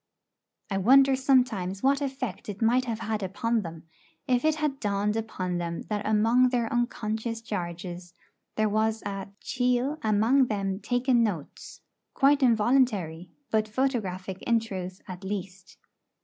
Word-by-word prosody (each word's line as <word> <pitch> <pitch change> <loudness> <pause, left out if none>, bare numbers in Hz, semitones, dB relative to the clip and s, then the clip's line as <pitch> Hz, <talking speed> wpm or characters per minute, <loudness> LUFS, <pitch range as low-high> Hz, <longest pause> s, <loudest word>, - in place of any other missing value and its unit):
I 195 - 0
wonder 270 +6 +6
sometimes 245 -8 +1
what 275 +1 +3
effect 265 -5 -4
it 205 -1 -6
might 245 +3 +3
have 230 -2 -3
had 220 -1 -2
upon 225 +4 -1
them, 165 -3 -8 0.4
if 250 -1 +2
it 315 0 +3
had 300 -3 -2
dawned 205 0 0
upon 185 -5 -3
them 170 -1 -4
that 210 -1 -2
among 225 +4 +4
their 240 -3 -1
unconscious 230 -1 -2
charges 175 -4 -6 0.4
there 215 0 +2
was 220 +1 0
a 195 -1 -4
'chiel 250 +4 0
amang 225 +5 +3
them 195 -3 -2
takin' 245 +1 +2
notes,' 195 -10 -4 0.3
quite 280 +1 +4
involuntary, 215 -8 +2 0.2
but 215 -1 +2
photographic 210 -7 -2
in 235 -1 +2
truth 185 -4 -7
at 185 +1 -8
least. 190 -1 -6
220 Hz, 140 wpm, -27 LUFS, 195-250 Hz, 0.4 s, wonder